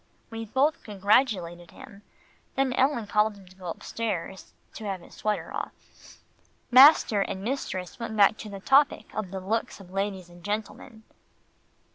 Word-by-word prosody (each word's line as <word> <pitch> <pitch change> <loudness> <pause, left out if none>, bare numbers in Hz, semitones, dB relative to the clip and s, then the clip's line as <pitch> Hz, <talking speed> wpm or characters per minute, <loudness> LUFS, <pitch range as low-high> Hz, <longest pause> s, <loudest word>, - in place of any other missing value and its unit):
We 225 0 -5
both 270 +8 +1
congratulated 200 -5 +1
him, 230 -7 -13 0.5
then 265 -1 +1
Ellen 255 -3 +1
called 210 0 +1
him 195 - -15
to 185 +1 -18
go 185 -1 -10
upstairs, 190 0 -4 0.2
to 220 - -8
have 195 -2 -3
his - - -16
sweater 210 -1 -3
off. - - -4 1.0
Master 255 -5 +7
and 190 0 -3
mistress 200 - -4
went 225 -2 -5
back 200 0 +6
to 215 - -7
the 200 -1 -7
topic 275 +7 +3
of 215 -4 -4
the 190 +1 -5
looks 215 +5 -2
of 185 -2 -14
ladies 195 -2 -3
and 175 0 -16
gentlemen. 220 +3 -5
210 Hz, 155 wpm, -27 LUFS, 190-230 Hz, 1.0 s, Master